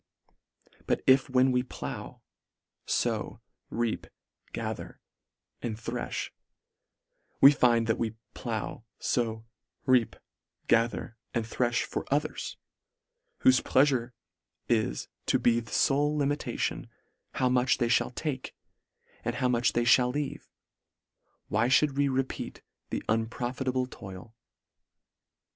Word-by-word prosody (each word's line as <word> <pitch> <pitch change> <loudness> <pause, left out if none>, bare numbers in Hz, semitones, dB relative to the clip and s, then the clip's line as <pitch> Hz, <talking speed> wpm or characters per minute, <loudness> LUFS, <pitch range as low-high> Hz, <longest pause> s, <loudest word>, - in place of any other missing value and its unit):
But - - +1
if 135 0 +5
when 130 0 +4
we 125 0 +3
plow 125 - -7 0.3
— - - -48
fow - - -1 0.2
— - - -53
reap 115 -2 -1 0.2
— - - -36
gather - - -5 0.3
— - - -54
and 115 -3 -3
threih, 115 - -4 1.1
we 140 - +10
find, 120 -4 +3
that 115 -1 0
we 115 -1 -1 0.2
plow 115 -1 -4
— - - -54
fow 115 -2 -1 0.2
— - - -47
reap 125 -3 +3 0.3
— - - -46
gather 115 0 +1
— - - -49
and 115 -2 0
threih 120 +1 0
for - - -5
others, 145 +2 -1 0.9
whofe 260 0 +6
pleafure 130 -3 +2 0.5
is 110 - 0 0.2
to - - +4
be 120 -1 +3
the 115 - -9
fole 145 +2 +2
limitation, 145 +1 -1 0.5
how 130 - +2
much 125 0 +3
they 120 -2 +1
fhall 125 +1 +2
take, 140 -5 -4 0.7
and 120 - -2
how 125 0 +1
much 120 0 +2
they 120 0 +1
mall 125 0 +1
leave, 145 +2 -4 1.0
why 110 +3 +2
mould 135 +4 +4
we 140 0 +3
repeat 130 -1 -3 0.3
the - - -3
unprofitable 125 +3 -1
toil 95 -4 -10
125 Hz, 130 wpm, -29 LUFS, 115-130 Hz, 1.1 s, we